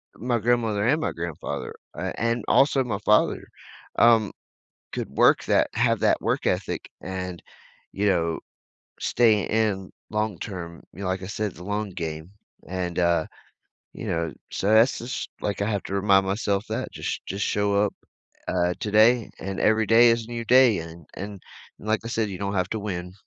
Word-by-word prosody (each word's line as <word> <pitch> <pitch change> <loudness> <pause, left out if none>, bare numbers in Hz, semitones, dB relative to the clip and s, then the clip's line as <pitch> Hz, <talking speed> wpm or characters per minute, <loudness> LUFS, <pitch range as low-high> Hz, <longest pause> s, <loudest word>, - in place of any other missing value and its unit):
my 120 +1 -1
grandmother 115 -2 +1
and 150 +5 +3
my - - -1
grandfather, 85 -2 -5 0.4
and 115 +1 0
also 135 -1 +4
my 110 -6 -2
father, 105 0 +3 0.5
um, 115 -3 +5 0.6
could - - -4
work - - +4
that - - +3
have - - +2
that - - +3
work - - -1
ethic - - -2
and, 90 -2 -5 0.5
you 105 +1 0
know, 85 -4 +1 0.6
stay 110 -4 +3
in 105 -4 0 0.2
long 105 -3 -1
term. 85 -5 -7
You 90 - -12
know, 100 - -3
like 95 0 -2
I - - -5
said, 105 0 -3
it's - - -15
a - - -8
long 105 +1 -2
game, 80 -1 -5 0.4
and, 90 -1 -3
uh, 85 -2 +2 0.7
you - - -7
know, 85 -2 -1 0.2
so 100 - -1
that's 115 +4 +5
just, 120 +2 -5
like 100 -1 -2
I 105 - 0
have 100 -2 -1
to 95 - -5
remind 100 -1 +4
myself 100 0 0
that - - -2
just - - -4
just 100 +1 -2
show 100 0 +1
up, 105 - -2 0.5
uh, 90 -1 +1
today, 110 +2 +4
and 95 0 -5
every 110 0 +3
day 115 +1 +7
is 115 -1 0
a 120 - -12
new 115 -1 -4
day, 125 -4 +6
and 80 0 -10
and 100 0 -7 0.4
and 110 - -9
like 110 +1 +2
I - - -4
said, 115 -2 0
you 95 - -6
don't 100 +1 -2
have 90 -1 0
to 110 - -2
win. 90 -3 -4
100 Hz, 185 wpm, -25 LUFS, 90-110 Hz, 0.7 s, day